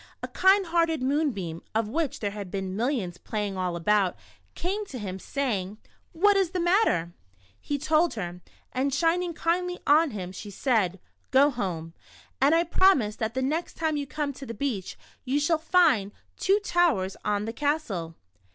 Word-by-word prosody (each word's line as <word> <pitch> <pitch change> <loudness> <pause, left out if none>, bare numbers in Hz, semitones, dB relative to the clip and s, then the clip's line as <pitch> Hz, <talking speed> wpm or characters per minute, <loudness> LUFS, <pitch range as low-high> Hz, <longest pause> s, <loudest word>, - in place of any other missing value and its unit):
A - - -2
kind 385 +1 +4
hearted 330 -4 +1
moonbeam, 255 - -1
of 225 -1 +1
which 295 +4 -2
there 205 -2 -1
had 200 -2 -7
been 190 0 -4
mil 230 +4 0
lions 190 -11 -2
playing 210 -2 -3
all 180 -2 -2
about, 195 +2 +2 0.4
came 390 +5 -2
to 265 - -7
him, 190 -4 -5
saying: 210 -7 -2 0.2
" - - -39
What 410 0 +7
is 385 -3 +2
the 365 - -1
matter? 345 - +2 0.3
" 95 +2 -33
He 290 - +1
told 310 +2 +2
her, 180 -4 -5 0.3
and 265 +2 0
shining 335 +4 +1
kindly 360 +2 0
on 310 +2 +5
him, 185 -6 -6
she 200 +3 -8
said: 200 -4 0 0.2
" - - -45
Go 280 +2 +5
home, 175 -9 -4 0.5
and 285 +4 +5
I 335 - +4
promise 330 - +3
that 225 +1 -3
the 260 - 0
next 315 +6 -2
time 320 -2 0
you 285 -1 -3
come 285 +1 -3
to 270 +1 -9
the 230 - -6
beach, 225 -6 -3 0.3
you 270 +2 0
shall 315 +2 +2
find 310 - +3 0.2
two 395 +2 +2
towers 325 - +1
on 210 0 0
the 225 - -4
castle." 230 - -2
260 Hz, 185 wpm, -27 LUFS, 195-325 Hz, 0.5 s, What